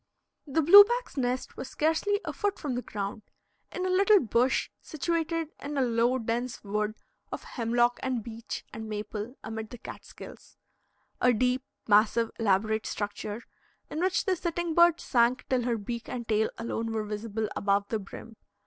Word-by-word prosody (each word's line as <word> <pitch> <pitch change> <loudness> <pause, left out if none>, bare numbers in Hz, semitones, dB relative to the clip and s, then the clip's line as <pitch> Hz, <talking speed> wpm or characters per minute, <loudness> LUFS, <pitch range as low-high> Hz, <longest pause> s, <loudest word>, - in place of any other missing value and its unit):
The 310 +3 +1
blue 400 +7 +11
back's 480 +4 -3
nest 255 -1 -2
was 265 - -6
scarcely 325 +9 +1
a - - -3
foot 410 -1 -1
from 285 -5 -3
the 245 - -2
ground, 205 -1 -5 0.5
in 365 - -3
a - - 0
little 395 +2 +6
bush 245 -1 +1
situated 330 +1 -2
in 290 +1 -4
a 270 - +3
low, 240 +1 +2
dense 235 +1 -3
wood 210 +1 -1 0.4
of - - -5
hemlock 240 0 +1
and 255 -4 -2
beech 230 0 -7
and 220 0 -6
maple, 210 +3 -5
amid 220 -1 -5
the 245 - -9
Catskills, - - -11 0.6
a 250 - +5
deep, 250 +3 +1 0.3
massive, 220 +2 +4
elaborate 220 +1 +1
structure, 205 +2 -4 0.5
in 305 - -3
which 365 0 +1
the 380 - +2
sitting 345 -1 -2
bird 340 0 +5
sank 245 0 +2
till 250 -2 +1
her 240 -2 +1
beak 230 +3 -5
and 235 -2 -5
tail 220 0 +2
alone 230 0 -3
were 220 -1 -1
visible 215 +1 -3
above 200 0 +1
the 220 - -1
brim. 215 +3 -11
240 Hz, 165 wpm, -28 LUFS, 220-305 Hz, 0.6 s, blue